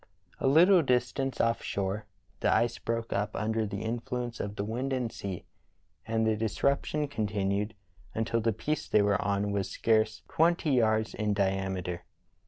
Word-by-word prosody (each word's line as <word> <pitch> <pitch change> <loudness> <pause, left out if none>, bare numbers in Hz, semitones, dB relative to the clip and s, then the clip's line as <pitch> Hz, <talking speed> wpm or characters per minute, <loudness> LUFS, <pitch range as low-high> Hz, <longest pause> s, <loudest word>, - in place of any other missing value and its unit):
A - - +1
little 175 +6 +7
distance 130 0 0
offshore 105 -3 -1 0.3
the - - +2
ice 120 0 +2
broke 115 0 -2
up 105 +1 -1
under 110 +1 0
the 100 +1 -4
influence 120 +1 -3
of 100 0 -4
the 100 - -2
wind 120 +6 -2
and 125 -3 -1
sea, 95 -3 -6 0.6
and 110 0 +1
the 110 0 +2
disruption 140 +7 0
continued 105 -3 -1 0.4
until 115 +1 0
the 115 +1 +2
piece 150 +8 -2
they 105 - +4
were 100 -1 +2
on 100 +1 0
was 100 -2 -1
scarce 110 +1 +1
twenty 165 -1 +2
yards 110 -3 +2
in 105 -1 0
di 100 -1 +3
ameter. 95 -2 -3
110 Hz, 160 wpm, -29 LUFS, 100-120 Hz, 0.6 s, little